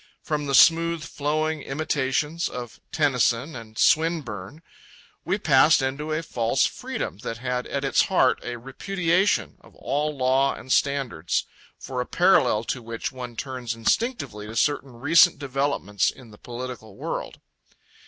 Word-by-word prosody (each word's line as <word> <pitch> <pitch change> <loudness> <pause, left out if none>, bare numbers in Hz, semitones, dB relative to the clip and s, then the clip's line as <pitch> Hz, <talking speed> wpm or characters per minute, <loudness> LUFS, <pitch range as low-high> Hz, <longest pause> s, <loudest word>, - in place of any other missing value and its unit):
From 150 -2 -2
the 140 - +1
smooth 165 +1 +5
flowing 155 +1 -1
imitations 150 +2 -1
of 120 -2 -8
Tennyson 130 -1 +1
and 110 -2 -10
Swinburne, 155 - +1 0.6
we - - +1
passed - - +5
into 140 +4 -3
a 155 +2 -1
false 115 -6 +1
freedom 95 - -4
that 115 +1 -5
had 125 0 -3
at 140 0 -3
its 135 - +3
heart 135 -9 +3
a 120 - -4
repudiation 180 - 0
of - - -19
all 150 +1 -2
law 130 +1 +2
and 130 - -9
standards, 135 - 0 0.3
for 130 -1 -4
a 125 - -5
parallel 135 - +3
to 125 +2 -3
which 115 0 -5
one 125 -2 -8
turns 125 -2 -4
instinctively 115 - -1
to 110 - -8
certain 140 +1 0
recent 145 +8 +5
developments 135 -8 0
in 125 -4 -12
the 105 - -16
political 120 -4 -8
world. - - -5
135 Hz, 145 wpm, -25 LUFS, 120-155 Hz, 0.6 s, smooth